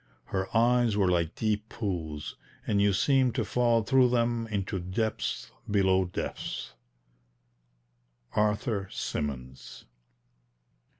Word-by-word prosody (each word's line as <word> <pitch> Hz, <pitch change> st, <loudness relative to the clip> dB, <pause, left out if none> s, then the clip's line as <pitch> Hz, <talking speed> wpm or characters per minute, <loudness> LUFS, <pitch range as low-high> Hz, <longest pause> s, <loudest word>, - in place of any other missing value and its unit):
Her 95 Hz, 0 st, 0 dB
eyes 120 Hz, -2 st, +3 dB
were 95 Hz, -3 st, +3 dB
like 85 Hz, -2 st, 0 dB
deep 110 Hz, -1 st, -1 dB
pools, 80 Hz, -8 st, -4 dB, 0.3 s
and 100 Hz, -2 st, +2 dB
you 100 Hz, 0 st, +4 dB
seemed 130 Hz, +4 st, +3 dB
to -, -, 0 dB
fall 120 Hz, -2 st, +2 dB
through 130 Hz, +2 st, +4 dB
them 120 Hz, -1 st, +1 dB
into 100 Hz, -2 st, -2 dB
depths 95 Hz, +5 st, -2 dB, 0.2 s
below 95 Hz, -2 st, +3 dB
depths. 90 Hz, -7 st, -5 dB, 1.6 s
ARTHUR 105 Hz, -1 st, 0 dB
SYMONS. 65 Hz, -3 st, -5 dB
105 Hz, 105 wpm, -29 LUFS, 95-115 Hz, 1.6 s, you